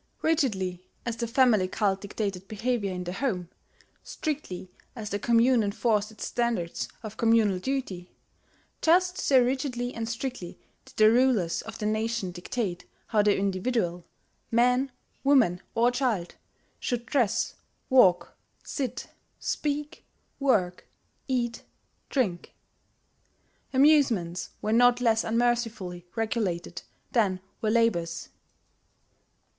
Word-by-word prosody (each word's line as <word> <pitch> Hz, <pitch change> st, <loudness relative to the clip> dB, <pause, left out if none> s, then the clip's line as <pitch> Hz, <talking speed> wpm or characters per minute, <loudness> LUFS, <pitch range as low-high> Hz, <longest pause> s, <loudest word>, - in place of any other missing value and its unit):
Rigidly 190 Hz, -, 0 dB, 0.2 s
as 235 Hz, -1 st, -3 dB
the 235 Hz, 0 st, -2 dB
family 230 Hz, -6 st, +4 dB
cult 195 Hz, 0 st, 0 dB
dictated 200 Hz, -2 st, -4 dB
behaviour 220 Hz, -1 st, -1 dB
in 180 Hz, 0 st, -4 dB
the 175 Hz, 0 st, -5 dB
home, 185 Hz, -7 st, -2 dB, 0.5 s
strictly 190 Hz, -, -5 dB, 0.2 s
as 215 Hz, -3 st, -6 dB
the 205 Hz, -, -1 dB
commune 235 Hz, +2 st, +4 dB
enforced 210 Hz, 0 st, 0 dB
its 220 Hz, -1 st, -7 dB
standards 235 Hz, -8 st, -1 dB, 0.2 s
of 215 Hz, 0 st, -8 dB
communal 225 Hz, -5 st, +3 dB
duty, 190 Hz, -7 st, -3 dB, 0.7 s
just 360 Hz, +2 st, +3 dB
so 265 Hz, -2 st, +4 dB
rigidly 250 Hz, -1 st, -2 dB
and 225 Hz, 0 st, -4 dB
strictly 235 Hz, -6 st, -5 dB, 0.3 s
did -, -, -17 dB
the 215 Hz, 0 st, +7 dB
rulers 235 Hz, -8 st, +2 dB
of 225 Hz, -1 st, -9 dB
the 210 Hz, -, -4 dB
nation 215 Hz, -2 st, -1 dB
dictate 180 Hz, +1 st, -4 dB, 0.2 s
how 215 Hz, -2 st, +3 dB
the 205 Hz, -1 st, +3 dB
individual 195 Hz, -2 st, -1 dB, 0.5 s
man, 250 Hz, +3 st, +3 dB, 0.3 s
woman, 250 Hz, -11 st, +4 dB
or 235 Hz, +2 st, +4 dB
child 245 Hz, -9 st, -1 dB, 0.5 s
should 240 Hz, -1 st, -2 dB
dress, 240 Hz, -4 st, +1 dB, 0.3 s
walk, 185 Hz, -10 st, +4 dB, 0.3 s
sit, 255 Hz, -3 st, -4 dB, 0.3 s
speak, 295 Hz, 0 st, -3 dB, 0.4 s
work, 205 Hz, -11 st, +1 dB, 0.4 s
eat, 240 Hz, -3 st, -1 dB, 0.5 s
drink. 200 Hz, -11 st, -1 dB, 1.2 s
Amusements 260 Hz, -, +3 dB
were 215 Hz, -, +1 dB
not 245 Hz, +1 st, +5 dB
less 225 Hz, -2 st, +2 dB
unmercifully 225 Hz, -6 st, -1 dB
regulated 195 Hz, -7 st, -2 dB, 0.3 s
than 200 Hz, -6 st, +2 dB, 0.2 s
were 220 Hz, -, +1 dB
labours. 195 Hz, -8 st, +1 dB
225 Hz, 115 wpm, -27 LUFS, 190-250 Hz, 1.2 s, the